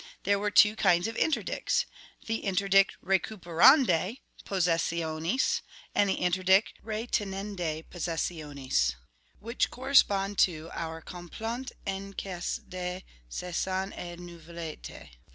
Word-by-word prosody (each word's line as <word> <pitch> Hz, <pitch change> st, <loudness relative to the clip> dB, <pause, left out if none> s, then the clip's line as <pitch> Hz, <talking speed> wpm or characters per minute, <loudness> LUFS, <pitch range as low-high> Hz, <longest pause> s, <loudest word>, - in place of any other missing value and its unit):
There 200 Hz, +1 st, +2 dB
were 210 Hz, +1 st, 0 dB
two 210 Hz, +1 st, +6 dB
kinds 175 Hz, -1 st, +3 dB
of 225 Hz, -, -5 dB
interdicts, 315 Hz, -, 0 dB, 0.4 s
the 225 Hz, 0 st, -1 dB
interdict 195 Hz, 0 st, +3 dB
recuperandae 195 Hz, -, +4 dB, 0.2 s
possessionis, 170 Hz, -, 0 dB, 0.3 s
and 205 Hz, -, +3 dB
the -, -, +2 dB
interdict 185 Hz, +3 st, +3 dB
retinendae 200 Hz, -7 st, -3 dB
possessionis, 150 Hz, -, -1 dB, 0.4 s
which 230 Hz, +3 st, -1 dB
correspond 205 Hz, -7 st, +3 dB
to 165 Hz, -2 st, +2 dB
our 160 Hz, 0 st, -5 dB
complainte 225 Hz, +8 st, -6 dB
en 195 Hz, 0 st, -4 dB
cas 180 Hz, -3 st, -3 dB
de 180 Hz, 0 st, -5 dB, 0.3 s
saisine 185 Hz, -, -2 dB
et 175 Hz, -1 st, -7 dB
nouvelete. 170 Hz, -, -9 dB
185 Hz, 100 wpm, -29 LUFS, 170-205 Hz, 0.4 s, two